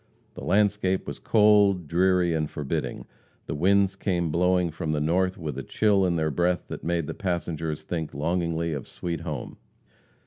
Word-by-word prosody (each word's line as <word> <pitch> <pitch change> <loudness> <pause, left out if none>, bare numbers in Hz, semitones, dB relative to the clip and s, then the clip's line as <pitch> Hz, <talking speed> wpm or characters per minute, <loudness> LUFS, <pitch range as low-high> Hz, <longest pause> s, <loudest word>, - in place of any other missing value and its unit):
The - - -9
landscape 100 -2 +1
was - - -6
cold, 105 -5 +4
dreary 90 +1 +2
and 75 -2 -1
forbidding; 70 -2 -4 0.4
the - - -4
winds 95 +5 +3
came 90 -5 -1
blowing 90 +1 +2
from 80 -1 -3
the 75 - 0
north 90 +5 +1
with 75 -5 -5
a - - -5
chill 100 -3 +2
in 85 - 0
their 80 -1 0
breath 90 +3 +1
that - - -6
made 85 -1 0
the - - -5
passengers 80 -4 -3
think 80 -1 -4
longingly 85 +2 -1
of 70 -3 -5
"sweet 85 -2 -4
home." 75 -6 -6
85 Hz, 170 wpm, -26 LUFS, 80-95 Hz, 0.4 s, cold